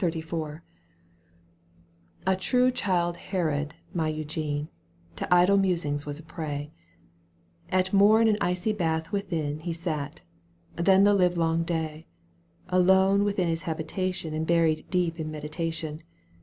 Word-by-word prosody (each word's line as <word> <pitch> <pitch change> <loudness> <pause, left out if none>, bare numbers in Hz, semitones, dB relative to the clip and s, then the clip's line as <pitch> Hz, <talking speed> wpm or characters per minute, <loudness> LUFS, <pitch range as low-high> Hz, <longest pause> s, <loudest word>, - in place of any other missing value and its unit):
XXXIV. 160 -2 -3 1.6
A 190 0 +3
true 250 +7 +2
Chflde 175 -7 0
Harold 155 -5 -2 0.2
my 160 -3 0
Eugene 155 -1 -3 0.5
To - - -4
idle 180 +3 +6
musing 170 -7 +1
was 145 0 -4
a 160 - -11
prey; 150 -3 -5 1.0
At 185 +1 +1
mom 205 +3 +6
an 220 -1 +4
icy 180 +4 0
bath 160 -4 -1
within 165 -7 -2
He 165 +2 -4
sat, 155 - -4 0.5
and 170 - -3
then 190 0 +7
the 205 0 +5
livelong 170 -3 +2
day. 160 -2 -3 0.6
Alone 190 +2 +4
within 200 -3 0
his 165 0 -1
habitation 165 +1 -3
And 160 +1 -2
buried 165 -2 +2
deep 175 -3 0
in 155 -1 -3
meditation. 155 +1 -4
165 Hz, 130 wpm, -27 LUFS, 155-185 Hz, 1.6 s, then